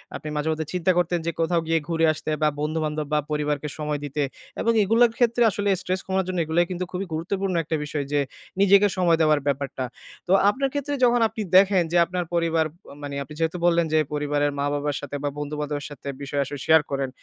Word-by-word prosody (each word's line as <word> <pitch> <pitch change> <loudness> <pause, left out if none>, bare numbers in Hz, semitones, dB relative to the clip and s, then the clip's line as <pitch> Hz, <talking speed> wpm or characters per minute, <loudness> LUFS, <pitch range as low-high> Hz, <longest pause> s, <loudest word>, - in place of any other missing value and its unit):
আপনি 155 - -6
মাঝেমধ্যে 155 +1 -1
চিন্তা 180 +1 +2
করতেন 175 0 +1
যে - - +1
কোথাও 165 +1 +2
গিয়ে 165 0 +2
ঘুরে 165 0 +2
আসতে 155 - -5
বা 150 - +4
বন্ধু-বান্ধব 155 -1 -2
বা 150 - +4
পরিবারকে 150 0 -1
সময় 150 -1 -2
দিতে 145 +1 -2 0.4
এবং 230 - +3
এগুলোর 230 +3 +4
ক্ষেত্রে 240 -1 +3
আসলে 205 +1 -1
stress 185 +1 -2
কমার 190 0 +1
জন্য 185 -1 -3
এগুলাই 170 +2 +2
কিন্তু 180 0 -2
খুবই 190 +2 -3
গুরুত্বপূর্ণ 190 +3 -2
একটা 160 +1 -2
বিষয়। 145 -1 -3
যে 145 - +2 0.4
নিজেকে 200 +1 +6
সময় 170 -3 +3
দেওয়ার 155 -2 +4
ব্যাপারটা। 135 -1 -2 0.5
তো - - +5 0.2
আপনার 275 +2 -1
ক্ষেত্রে 285 0 -2
যখন 240 -1 +4
আপনি 220 - -6 0.2
দেখেন 190 -2 +5
যে 175 - +3
আপনার 180 0 -3
পরিবার 165 -1 +2
প - - -26 0.3
মানে 140 -1 -5
আপনি 150 - -12
যেহেতু 165 +2 0
বললেন, 170 -1 +3
যে 155 - +5
পরিবারের 145 0 0
মা-বাবার 145 0 -1
সাথে 145 0 -6
বা 145 - +1
বন্ধু-বান্ধবের 150 -1 -3
সাথে 145 -1 -11
বিষয় 140 0 -2
আসলে 140 +1 -7
শেয়ার 160 -1 +6
করেন। 135 -1 -1
160 Hz, 200 wpm, -24 LUFS, 145-185 Hz, 0.5 s, নিজেকে